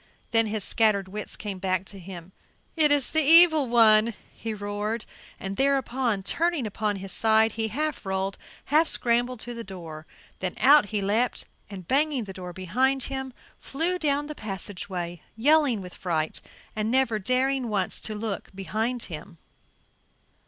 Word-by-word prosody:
Then 225 -1 +3
his 210 -1 -2
scattered 210 -4 +3
wits 210 +2 -6
came 200 -3 -6
back 185 0 -1
to 195 0 -11
him. 180 -1 -10 0.4
"It 305 -3 +4
is 285 -3 +2
the 315 - +4
evil 315 -1 +7
one," 225 -1 +5 0.2
he 225 - -6
roared. 210 +2 -4 0.3
And 195 0 -5
thereupon, 260 -6 0
turning 330 - 0
upon 210 0 -2
his 195 0 -6
side, 220 +1 +4
he 220 0 -2
half 300 +6 -3
rolled, 190 0 -3 0.3
half 310 +3 +3
scrambled 245 +1 0
to 240 - -6
the 230 0 -7
door. 165 -5 -9 0.3
Then 185 -1 -3
out 285 -4 +6
he 205 -1 -2
leaped 220 +5 0 0.2
and, 190 -4 -9
banging 280 -3 +1
it 190 - -7
to 180 -1 -8
behind 250 +10 0
him, 265 0 -4 0.3
flew 340 +6 -2
down 290 -2 0
the 300 - -6
passageway, 190 - -5
yelling 275 -2 +3
with 180 -1 -10
fright 160 -4 -2 0.3
and 215 0 -1
never 245 -3 +2
daring 255 +3 0
once 195 -3 -1
to 215 - -4
look 210 -1 -4
behind 220 +5 -2
him. 170 +1 -9
220 Hz, 160 wpm, -26 LUFS, 195-265 Hz, 0.4 s, evil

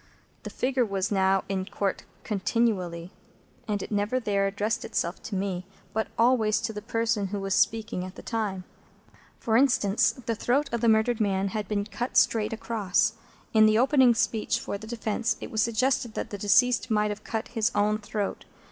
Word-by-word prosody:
The - - -7
figure 255 0 0
was 195 -2 -2
now 190 -1 +2
in 195 -1 -1
Court 200 -1 -3 0.2
continually, 190 -5 -1 0.6
and 205 -2 -1
it - - -9
never 205 +5 0
there 200 -4 0
addressed 210 +4 -2
itself 170 +1 -2
to 205 - -6
me, 185 -1 -3 0.3
but 220 0 -1
always 230 -3 +3
to 225 -1 -3
the 210 - -6
person 225 -2 -1
who 200 +1 -4
was 195 0 -2
speaking 215 -1 +1
at 185 +1 -8
the - - -11
time. 210 -5 -2 0.8
For 225 - 0
instance: 235 -5 +3
the 235 -3 -4
throat 265 +6 0
of 235 - -1
the 235 - +4
murdered 220 +2 +3
man 195 -1 +1
had 210 0 -4
been 205 -1 -1
cut 240 +3 -3
straight 220 -2 +3
across. 215 -2 0 0.4
In 220 -1 +6
the 215 0 +4
opening 260 -1 +5
speech 225 -1 0
for - - -5
the 220 +2 -8
defence, 225 -1 -1
it - - -8
was 220 - +1
suggested 235 +1 0
that - - -4
the 205 - -4
deceased 230 +4 +3
might 210 -1 +1
have 210 +1 -7
cut 225 -1 -4
his 225 -1 0
own 210 +1 +2
throat. 210 -1 -4
215 Hz, 185 wpm, -27 LUFS, 200-230 Hz, 0.8 s, In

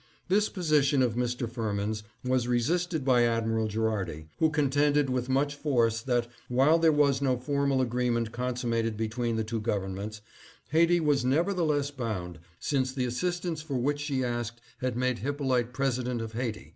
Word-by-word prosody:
" - - -38
This 210 +1 +3
position 150 -6 +2
of 120 -3 +1
Mr. 120 0 -1
Firmin's 110 -2 -2 0.2
was 125 -1 +1
resisted 155 +5 0
by 125 -3 +4
Admi 115 -1 +1
ral 110 -1 +1
Gherardi, 105 -8 -2
who 160 - +4
contended 145 -1 +2
with 125 0 -1
much 140 +2 +1
force 120 -6 +1
that, 120 -1 0 0.2
while 135 +7 +4
there 165 -1 +5
was 140 -2 +3
no 130 -2 +2
formal 140 +1 +1
agreement 120 -2 0
consummated 120 -3 -1
between 115 +1 -1
the 110 - 0
two 110 0 -3
governments, 105 0 -3 0.5
Haiti 170 +2 +4
was 145 -5 +2
nevertheless 150 0 +1
bound, 100 - -4 0.2
since 130 -3 0
the 130 -1 -1
assistance 170 +5 -2
for 150 -3 -5
which 145 +4 0
she 140 -3 -1
asked 120 -1 -3 0.2
had 125 -2 -2
made 125 -1 0
Hyppolite 130 -3 0
President 125 -2 -1
of 115 -1 -5
Haiti. 115 - -4
125 Hz, 165 wpm, -28 LUFS, 115-145 Hz, 0.5 s, there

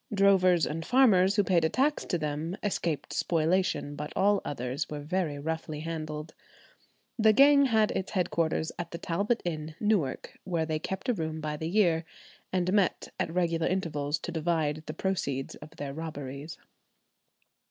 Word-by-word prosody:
Drovers 190 -4 +4
and 165 +2 -3
farmers 205 -5 +4
who 205 - +4
paid 175 -4 +2
a 160 - +3
tax 285 - +1
to 175 - 0
them 155 +4 -3
escaped 170 -8 -2
spoliation; 165 -2 0
but 150 +1 -5
all 205 +1 +3
others 130 +2 -3
were 150 -1 -5
very 155 -1 -1
roughly 155 0 -4
handled. 155 -1 -5 0.9
The 220 0 +6
gang 280 +3 +7
had 220 -4 +3
its 190 - -3
headquarters 165 -4 0
at 170 -1 -4
the 170 - -6
Talbot 200 +8 -1
Inn, 155 -2 -4
Newark, 205 -11 -1
where 170 -4 -1
they 155 -1 -2
kept 190 - -5
a - - +4
room 160 -5 -3
by 155 -1 -3
the 160 +2 -4
year, 170 -4 +3 0.5
and 185 0 0
met 200 -3 +1
at - - -1
regular 170 -2 +1
intervals 155 -5 -1
to - - -5
divide 160 -2 0
the 155 - -5
proceeds 140 -8 -2
of 155 +2 -13
their 140 -1 -5
robberies. 145 -1 -6
165 Hz, 165 wpm, -29 LUFS, 155-190 Hz, 0.9 s, gang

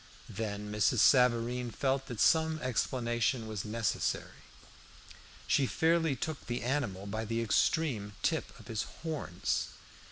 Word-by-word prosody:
Then 105 -2 -4
Mrs. 105 +4 +2
Savareen 125 0 +4
felt 135 +3 -1
that 120 -5 -6
some 160 -1 +4
explanation 120 -1 0
was 110 -3 -4
necessary. 110 -1 -2 1.0
She 135 - +2
fairly 160 -1 +2
took 155 +4 -5
the 120 0 -2
animal 120 -8 -1
by 110 +2 -3
the 115 +1 -2
extreme 115 -1 +1
tip - - 0
of - - -14
his 110 -2 -2 0.2
horns. 155 - -2
120 Hz, 125 wpm, -32 LUFS, 110-135 Hz, 1.0 s, Savareen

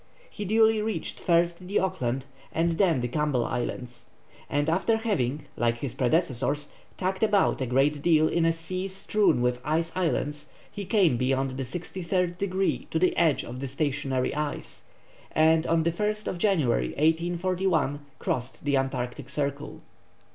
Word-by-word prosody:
He 205 - -5
duly 220 +1 +4
reached 220 0 -3
first 170 0 +1
the 200 - 0
Auckland 135 -9 -1 0.3
and 170 +1 +1
then 170 -10 +3
the 120 - -1
Campbell 140 -2 0
Islands, 120 0 -4 0.4
and 145 +1 0
after 190 +7 +2
having, 155 - -1
like 120 0 +1
his 125 -1 -4
predecessors, 140 +1 0 0.3
tacked 190 0 -2
about 205 -8 +3
a 130 - -1
great 140 +4 +2
deal 155 -1 +4
in 170 +1 +1
a 165 - +4
sea 185 +3 -4
strewn 195 -7 +1
with 125 0 +1
ice 165 +3 0
islands, 150 -5 -1 0.2
he 200 - -6
came 185 - +3
beyond 135 +2 0
the 135 +1 -4
sixty 175 +7 -5
third 180 0 0
degree 195 -1 -1
to - - -1
the 185 +3 +2
edge 160 -4 +3
of 125 +2 -7
the 135 - -3
stationary 140 -2 -1
ice, 150 -1 -4 0.5
and 160 +1 +4
on 165 -1 +2
the 170 - +2
1st 210 +3 -2
January, 150 - +2
1841, 170 -1 +1
crossed 125 +3 -3
the 140 -1 +3
Antarctic 130 -2 -3
Circle. 140 0 -3
160 Hz, 155 wpm, -27 LUFS, 135-185 Hz, 0.5 s, duly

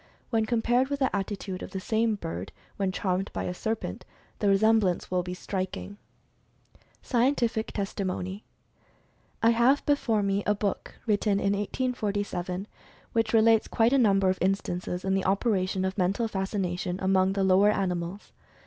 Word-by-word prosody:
When 220 -2 +1
compared 240 +2 +2
with 280 0 -2
the 265 -5 0
attitude 195 -1 -4
of - - -6
the 190 - -4
same 220 +3 +1
bird, 90 - -6 0.3
when 195 -2 0
charmed 185 0 -1
by - - -2
a 180 - -3
serpent, 220 +4 -4 0.4
the 205 - +1
resemblance 200 -3 +3
will 180 -1 +2
be 180 +1 -5
striking. 190 +2 -4 1.1
SCIENTIFIC 240 -3 +1
TESTIMONY. 195 -1 -3 1.0
I 230 - +6
have 240 +5 +3
before 230 -7 +2
me 200 0 +1
a 210 - +3
book 205 -1 -3
written 210 -1 +2
in 200 0 +1
1847, 205 -4 -2 0.5
which 225 -1 +1
re 225 - +5
lates 225 0 +4
quite 230 +3 +3
a 275 - +5
number 195 -5 +4
of 185 - -4
instances 180 -1 -1
of 190 - +1
the 195 -1 +1
operation 190 -2 +1
of 190 +2 -3
Mental 195 +6 +1
Fascination 190 -3 -2
among 190 0 +2
the 195 -1 0
lower 190 +2 +5
animals. 180 -1 -2
200 Hz, 155 wpm, -27 LUFS, 185-225 Hz, 1.1 s, I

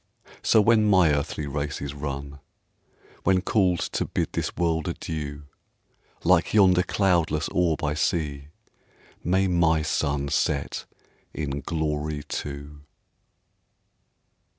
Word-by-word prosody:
So 110 - +5
when 110 0 +4
my 95 -6 +5
earthly 70 +1 -2
race 70 0 -3
is 70 0 -5
run, 70 -1 -6 0.8
When 95 0 +3
called 95 -5 +2 0.2
to - - 0
bid - - -2
this - - -3
world 80 -2 0
adieu, 75 -4 -5 0.8
Like 90 +3 +3
yonder 95 -3 +6
cloudless 90 -5 +1
orb 85 -2 0
I 75 -1 +1
see, 75 -2 -1 0.8
May 95 +3 +2
my 85 -3 +2
sun 70 -2 -1
set 70 0 -1 0.5
in 70 -2 -3
glory 75 -1 -2
too. 70 0 -6
80 Hz, 110 wpm, -25 LUFS, 70-90 Hz, 0.8 s, yonder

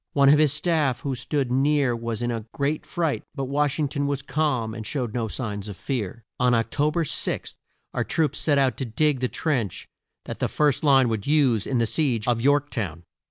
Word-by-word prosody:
One 140 -1 +5
of 150 +1 +6
his 155 -3 +4
staff 150 -4 +1
who 140 - -2
stood 135 0 -2
near 135 -1 +2
was 115 0 -4
in 120 - 0
a 115 -1 -4
great 145 +2 -1
fright, 165 -5 -1
but 135 - -2
Wash 145 +1 0
ing 150 -2 +1
ton 140 +1 -2
was 140 -1 -2
calm 130 -6 -1
and 110 -1 -6
showed 120 0 -3
no 115 -2 -1
signs 105 -3 -4
of 100 -2 -7
fear. 115 -4 -4 0.2
On 125 -1 +4
Oc 115 0 0
to 150 +1 +2
ber 165 +2 0
6, 150 - -2 0.4
our - - 0
troops 155 -3 0
set 145 -3 +2
out 135 -2 +2
to 135 - -2
dig 140 +4 +1
the 130 - +1
trench 125 - -2 0.4
that - - -6
the - - +1
first 145 -1 +1
line 135 -3 +5
would 110 0 -3
use 135 -8 +3
in 130 - 0
the 115 - +2
siege 120 -4 0
of 120 -2 +1
York 145 +2 +2
town. 85 - -4
135 Hz, 220 wpm, -25 LUFS, 115-145 Hz, 0.4 s, of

